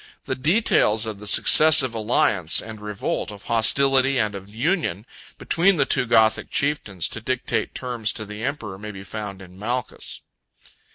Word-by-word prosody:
The -, -, -2 dB
details 130 Hz, -, +2 dB
of 110 Hz, -3 st, -6 dB
the 105 Hz, -, -8 dB
successive 145 Hz, 0 st, +6 dB
alliance 105 Hz, -6 st, +1 dB
and 110 Hz, -1 st, -9 dB
revolt, 105 Hz, 0 st, -4 dB
of 100 Hz, -1 st, -12 dB
hostility 135 Hz, +4 st, +2 dB
and 105 Hz, -3 st, 0 dB
of 100 Hz, 0 st, -9 dB
union, 115 Hz, -, -2 dB, 0.3 s
between 180 Hz, +3 st, +2 dB
the 140 Hz, -4 st, +1 dB
two 130 Hz, -3 st, +1 dB
Gothic 110 Hz, -1 st, +2 dB
chieftains, 110 Hz, -, -1 dB
to 115 Hz, -, -7 dB
dictate 130 Hz, +2 st, -2 dB
terms 120 Hz, -4 st, -3 dB
to 110 Hz, -, -6 dB
the 105 Hz, +1 st, -8 dB
emperor, 110 Hz, -9 st, -5 dB
may 105 Hz, +1 st, -8 dB
be 95 Hz, -2 st, -9 dB
found 100 Hz, -2 st, -7 dB
in 90 Hz, 0 st, -15 dB
Malchus. 120 Hz, +4 st, -5 dB
110 Hz, 160 wpm, -22 LUFS, 105-135 Hz, 0.3 s, successive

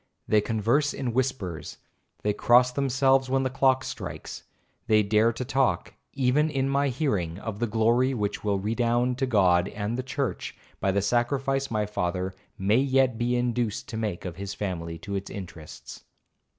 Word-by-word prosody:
They 105 Hz, -1 st, +4 dB
converse 115 Hz, +7 st, +1 dB
in 125 Hz, -4 st, -3 dB
whispers—they 105 Hz, -4 st, -4 dB
cross 125 Hz, +4 st, +4 dB
themselves 135 Hz, 0 st, +2 dB
when 135 Hz, 0 st, +2 dB
the 130 Hz, -, -1 dB
clock 130 Hz, 0 st, +3 dB
strikes—they 110 Hz, -3 st, -3 dB
dare 110 Hz, +3 st, +3 dB
to 125 Hz, +2 st, -4 dB
talk, 135 Hz, 0 st, 0 dB, 0.2 s
even 140 Hz, +3 st, +2 dB
in 135 Hz, -3 st, 0 dB
my 140 Hz, +1 st, +2 dB
hearing, 105 Hz, -, -1 dB
of 105 Hz, 0 st, -6 dB
the 120 Hz, -, 0 dB
glory 115 Hz, +4 st, +2 dB
which 105 Hz, -3 st, -2 dB
will 100 Hz, -2 st, +1 dB
redound 120 Hz, +4 st, 0 dB
to 135 Hz, -, +1 dB
God 90 Hz, -6 st, +3 dB
and 105 Hz, +4 st, -3 dB
the -, -, +1 dB
church, 130 Hz, 0 st, -3 dB, 0.2 s
by 95 Hz, -, 0 dB
the 100 Hz, 0 st, 0 dB
sacrifice 135 Hz, +5 st, 0 dB
my 105 Hz, -2 st, 0 dB
father 95 Hz, -2 st, -2 dB, 0.2 s
may 100 Hz, +4 st, +2 dB
yet 130 Hz, -3 st, +2 dB
be 120 Hz, +1 st, +1 dB
induced 120 Hz, -3 st, -1 dB
to 110 Hz, -, -5 dB
make 105 Hz, -6 st, -3 dB
of 85 Hz, -2 st, -6 dB
his 100 Hz, 0 st, -5 dB
family 85 Hz, -4 st, -4 dB
to 100 Hz, +5 st, -7 dB
its 100 Hz, 0 st, -3 dB
interests. 85 Hz, -5 st, -9 dB
120 Hz, 165 wpm, -26 LUFS, 100-130 Hz, 0.2 s, They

